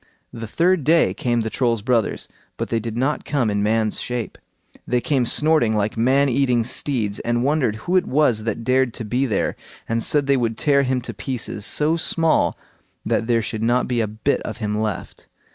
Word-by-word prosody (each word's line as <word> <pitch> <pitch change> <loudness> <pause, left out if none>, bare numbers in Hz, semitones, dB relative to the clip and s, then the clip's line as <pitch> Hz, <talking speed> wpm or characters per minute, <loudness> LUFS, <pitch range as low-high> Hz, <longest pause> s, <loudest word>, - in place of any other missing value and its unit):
The 115 -1 -6
third 170 +6 +2
day 165 +4 +3
came 120 -2 0
the 110 0 -3
Troll's 115 -5 0
brothers, 120 -3 0 0.3
but - - -3
they 115 - 0
did 115 0 -5
not 135 +4 0
come 125 -7 0
in 100 0 0
man's 110 +1 0
shape. 120 -2 -4 0.5
They 125 - +1
came 130 -1 0
snorting 150 -8 +2
like 105 0 -1
man 130 +5 +3
eating 125 -2 +2
steeds, 115 -4 -2
and 120 +1 -1
wondered 140 -6 +1
who 175 +12 -3
it 185 - +1
was 125 -7 +2
that 115 0 -3
dared 130 0 +1
to 115 - -4
be 125 +5 0
there, 105 -5 -1 0.3
and 115 0 0
said 145 +4 +2
they 140 0 +3
would 115 -3 -1
tear 140 +1 +3
him 130 -1 0
to - - -7
pieces, 115 -5 -4
so 155 +3 +1
small 165 0 +1 0.5
that 115 - 0
there 115 -2 +2
should 110 0 -4
not 120 +2 +1
be 120 -2 0
a 110 - 0
bit 110 +1 -1
of 110 - -6
him 105 -3 -2
left. 105 -3 -4
120 Hz, 200 wpm, -21 LUFS, 110-135 Hz, 0.5 s, day